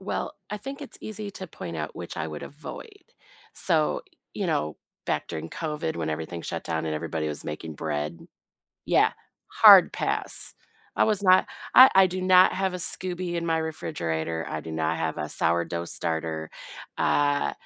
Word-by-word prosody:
Well, 190 - -3 0.2
I 210 - -2
think 275 +7 -7
it's 275 - -9
easy 215 -1 -6
to 190 - -7
point 85 - -7
out 75 -1 -4
which 85 - -7
I 80 -1 -2
would 75 -2 -7
avoid. 400 - -10 0.5
So, 160 -5 +2 0.3
you - - -2
know, 75 0 -1 0.3
back - - -1
during 80 +1 -5
COVID 150 - -3
when 80 -2 -2
everything 80 +2 -5
shut - - -5
down 80 0 -2
and 80 - -2
everybody 80 0 -3
was 75 - -5
making 75 +1 -6
bread. 75 +3 -4 0.6
Yeah, - - +4 0.4
hard - - +8
pass. - - -2 0.4
I - - +4
was 210 -2 +1
not 185 -1 +6 0.3
I 260 +1 +11
I 190 0 +7
do 185 +1 -4
not 185 0 +6
have 190 -1 -1
a - - -1
SCOBY 180 0 -1
in 170 0 -2
my 165 -1 +1
refrigerator; 85 - -3
I 80 - -3
do 80 +1 -8
not 80 +1 0
have 80 -1 -2
a 75 - -3
sourdough 85 +2 0
starter, 80 -1 -3 0.5
uh, 145 0 +2
85 Hz, 175 wpm, -26 LUFS, -, 0.6 s, I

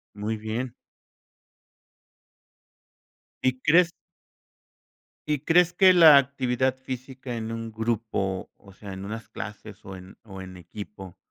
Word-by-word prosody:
Muy 105 +2 -3
bien. 115 +3 -4 2.7
¿Y 130 0 +1
crees? 170 +5 +5 1.4
¿Y 150 -2 0
crees 175 +4 +4
que 185 +1 +6
la 165 -5 +9
actividad 130 -1 +1
física 130 -1 -7
en 115 0 -4
un 115 0 -5
grupo, 110 -4 -2
o 100 - -17
sea, 100 0 -10
en 95 +1 -7
unas 110 +2 -7
clases, 105 -1 -9
o 95 0 -8
en 95 +1 -13
o 95 -3 -10
en 95 -1 -9
equipo, 95 +1 -10
115 Hz, 120 wpm, -26 LUFS, 100-130 Hz, 2.7 s, la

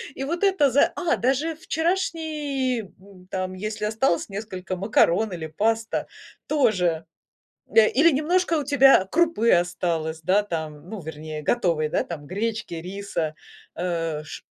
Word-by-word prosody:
И 270 - -4
вот 340 +7 -2
это 380 -8 +4
за 280 - +4
А 345 -2 0
даже 275 +6 0
вчерашний, 315 -6 -1
м, 190 -1 -17
там, 185 -1 -3
если 215 +3 -4
осталось 215 -4 +1
несколько 195 -2 -5
макарон 200 +1 +2
или 165 -3 -5
паста 220 +7 -1 0.4
тоже, 185 - +1 0.7
э, 220 -1 +7
или 320 +5 +5
немножко 335 +5 +1
у - - -2
тебя 270 -7 +5
крупы 320 -9 +3
осталось, 170 -2 0
да, 190 +6 +3
там, 160 -3 -5
ну, 220 -1 -6
вернее 155 0 -7
готовой, 165 -7 +1
да, - - 0
там, 155 -4 -7
гречки, 215 +1 -3
риса, 170 -2 -4 0.4
э, 165 -3 -2
ш - - -9
205 Hz, 140 wpm, -24 LUFS, 170-275 Hz, 0.7 s, э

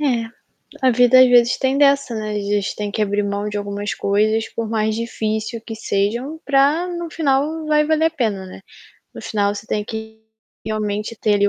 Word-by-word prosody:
É, 250 -6 +1 0.6
a 260 - +5
vida 245 +2 +6
às 255 - +8
vezes 240 -1 +4
tem 265 +1 +1
dessa 280 -4 +3
não 215 - -4
é, 215 - -4
às 205 -1 -3
vezes 205 -1 0
tem 210 -1 -4
que 215 - -1
abrir 205 0 0
mão 200 +1 -2
de 210 - -4
algumas 205 0 -4
coisas 215 +2 +1
por 230 -1 -3
mais 220 -1 0
difícil 220 0 -3
que 225 - -5
sejam, 225 +8 -2
para 285 +5 +2
no 345 -2 -5
final 305 +1 0
vai 300 0 +3
valer 315 +1 +2
a 325 - +1
pena, 215 -10 -2
né. 185 - -11 0.5
No - - -9
final 205 -2 0
você 205 +1 -8
tem 210 -1 -2
que 220 0 -7 0.5
realmente 215 +1 -3
ter, 210 -2 +2
ali, 205 0 +3
220 Hz, 205 wpm, -20 LUFS, 210-270 Hz, 0.6 s, às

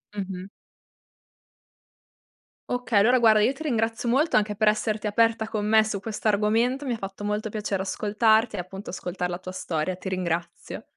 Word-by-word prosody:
Mh-mh. 190 -2 -5 2.2
Okay, 245 -4 +1
allora 245 +5 +5
guarda 220 -3 +5
io 230 +5 +3
ti 310 - -9
ringrazio 230 -4 -1
molto, 285 +7 +2
anche 210 0 +2
per 215 - +2
esserti 215 0 +1
aperta 225 +1 +2
con 215 -2 -3
me 220 0 +5
su 205 -3 -3
questo 220 +1 -4
argomento, 225 +6 +1
mi 255 - -2
ha - - -3
fatto 195 0 -7
molto 210 +1 -2
piacere 205 -2 -2
ascoltarti 220 +3 +2
e - - -3
appunto 190 +3 -7
ascoltare 180 -1 -4
la 175 - -3
tua 185 0 -8
storia 170 0 -2
ti 190 +1 -6
ringrazio. 175 -2 -4
210 Hz, 170 wpm, -25 LUFS, 195-225 Hz, 2.2 s, allora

